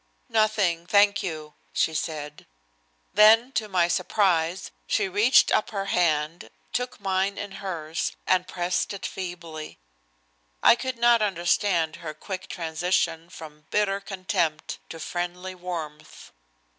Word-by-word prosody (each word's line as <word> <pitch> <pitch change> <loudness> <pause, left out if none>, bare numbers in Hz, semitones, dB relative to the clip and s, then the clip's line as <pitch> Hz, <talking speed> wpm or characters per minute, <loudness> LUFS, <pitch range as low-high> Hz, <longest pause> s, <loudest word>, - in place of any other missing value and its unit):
"Nothing, 205 -6 +1
thank 205 +1 +4
you," 155 -4 -5 0.2
she 160 - +1
said. 150 -2 -5 0.7
Then 225 +4 +6
to 220 -4 -2
my 180 -3 +3
surprise 175 -1 +1 0.2
she 210 -2 +1
reached 205 +7 +4
up 215 - +2
her 195 -2 -3
hand, 160 -1 0 0.2
took 250 -1 -2
mine 195 0 0
in 205 -1 -5
hers, 165 -4 -3
and 185 -1 +2
pressed 175 +2 -1
it 195 - -6
feebly. 170 -4 -6 0.9
I - - +8
could 260 0 -4
not 235 -1 +5
understand 175 -3 +1
her 160 -3 -7
quick 185 -2 -6
transition 165 0 -1
from 150 -3 -12
bitter 200 -1 +1
contempt 185 -5 -2
to 165 - -8
friendly 175 +3 -4
warmth. 170 -4 -7
180 Hz, 125 wpm, -26 LUFS, 165-205 Hz, 0.9 s, I